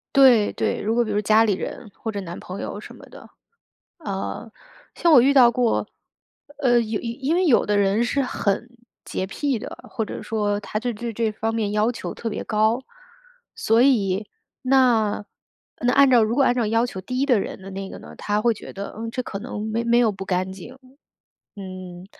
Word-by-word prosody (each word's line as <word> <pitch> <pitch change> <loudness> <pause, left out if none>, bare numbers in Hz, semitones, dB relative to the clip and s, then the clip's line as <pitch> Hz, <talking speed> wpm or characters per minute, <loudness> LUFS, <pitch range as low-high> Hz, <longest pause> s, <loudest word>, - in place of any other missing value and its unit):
对 250 -6 +6
对， - - -1
如 220 +2 0
果 240 - +3
比 215 - -4
如 205 - 0
说 - - +2
家 215 +2 +4
里 210 -3 +2
人， 205 +3 -6
或 225 - -5
者 200 -1 -4
男 175 -1 -7
朋 185 +2 -7
友 205 - -5
什 - - -11
么 - - -14
的。 - - -14 0.7
呃， 210 -2 -5 0.5
像 340 - +3
我 250 - +8
遇 275 +3 +4
到 245 -3 +7
过 245 -2 +1 0.7
呃， 240 -3 +4
有 220 -1 -2
因 265 +7 -2
为 365 0 +2
有 260 -8 +4
的 205 0 +1
人 200 +3 +2
是 275 +3 0
很 235 -2 -1 0.4
洁 185 - -3
癖 275 +4 -1
的， - - -7
或 225 -4 -2
者 - - -7
说 205 -2 -1
他 210 +1 -4
就 245 +1 -2
对 235 +2 -5
这 225 0 0
方 225 +1 -2
面 215 -3 -1
要 215 +3 +2
求 - - -6
特 230 - -4
别 210 - -4
高。 220 +3 +1 0.8
所 225 +2 +3
以， 210 -6 +2 0.3
那 245 -6 +2 0.6
那 245 +1 +2
按 280 -1 +6
照 240 -3 +6
如 225 +3 0
果 275 - +4
按 245 - +4
照 240 -3 0
要 230 +2 +2
求 190 -6 -6
低 255 +7 -1
的 250 -6 +3
人 190 - -5
的 195 - -9
那 195 0 -6
个 - - -8
呢， - - -12
他 205 0 -1
会 235 0 +3
觉 - - -10
得： 200 +1 -7
“嗯， 225 0 -4
这 255 - -2
可 195 - -6
能 215 -2 -5
没 230 +1 -1
没 235 0 +3
有 230 -3 +4
不 195 -1 -7
干 185 0 -1
净， 235 +8 -11 0.8
嗯， 185 -2 -9
225 Hz, 225 characters per minute, -23 LUFS, 205-245 Hz, 0.8 s, 我